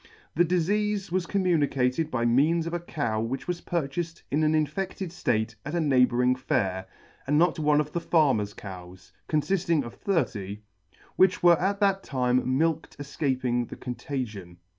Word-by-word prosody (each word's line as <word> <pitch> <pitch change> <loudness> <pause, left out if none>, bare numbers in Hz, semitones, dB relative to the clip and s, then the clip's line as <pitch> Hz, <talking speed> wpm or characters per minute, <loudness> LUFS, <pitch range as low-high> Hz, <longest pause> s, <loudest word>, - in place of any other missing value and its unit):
The 175 - +4
difeafe 195 +3 0
was 180 -1 0
communicated 155 -6 +1
by 120 -5 -1
means 150 +8 +3
of 170 - -4
a 175 - -1
cow 120 -10 -2
which 120 +4 -4
was 175 -1 -3
purchaled 165 +1 -3
in 150 +3 +1
an 155 0 +3
infeded 170 +4 -2
date 110 0 0
at 150 +4 -4
a - - +1
neighbouring 125 -4 +3
fair, 100 -9 -1 0.4
and 145 +2 +2
not 175 +1 +3
one 150 -1 +3
of 150 0 -1
the 170 - -2
Farmer's 130 -13 +2
cows 90 -2 -10 0.2
(confifting 165 0 +1
of 120 - -8
thirty) 105 - -2 0.5
which 185 -1 +3
were 175 -2 +6
at 200 +2 0
that 195 -1 +3
time 130 -2 0
milked 160 +1 -1
efcaped 130 -4 -1
the - - -7
contagion. 115 -8 -6
150 Hz, 160 wpm, -27 LUFS, 125-170 Hz, 0.5 s, were